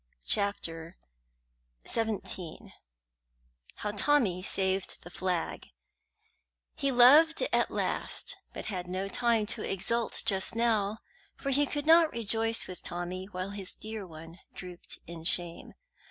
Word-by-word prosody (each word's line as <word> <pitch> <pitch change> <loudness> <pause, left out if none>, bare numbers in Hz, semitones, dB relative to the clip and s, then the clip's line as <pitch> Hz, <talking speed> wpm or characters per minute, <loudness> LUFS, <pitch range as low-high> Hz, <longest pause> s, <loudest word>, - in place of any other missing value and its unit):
CHAPTER 170 - +1 0.9
XVII 205 -6 -3 1.0
HOW 210 - -3
TOMMY 210 -5 +2
SAVED 190 0 -1
THE 175 - -11
FLAG 180 -2 -2 1.1
He 275 - 0
loved 290 - +7
at - - +3
last, - - -2 0.2
but - - -7
had 180 -4 -4
no 185 +2 -3
time 230 +1 +1
to 220 +1 -2
exult 230 +5 0
just 190 +1 0
now, 220 -3 +1 0.4
for 275 - -3
he 285 +2 +3
could 290 +1 -3
not 325 0 +6
rejoice 225 0 -1
with 185 - -9
Tommy 175 +2 -5
while 190 0 -5
his 200 -2 -7
dear 215 -3 -6
one 165 +1 -11 0.2
drooped 180 -1 -9
in 165 -1 -8
shame. 170 0 +2
200 Hz, 125 wpm, -30 LUFS, 180-230 Hz, 1.1 s, loved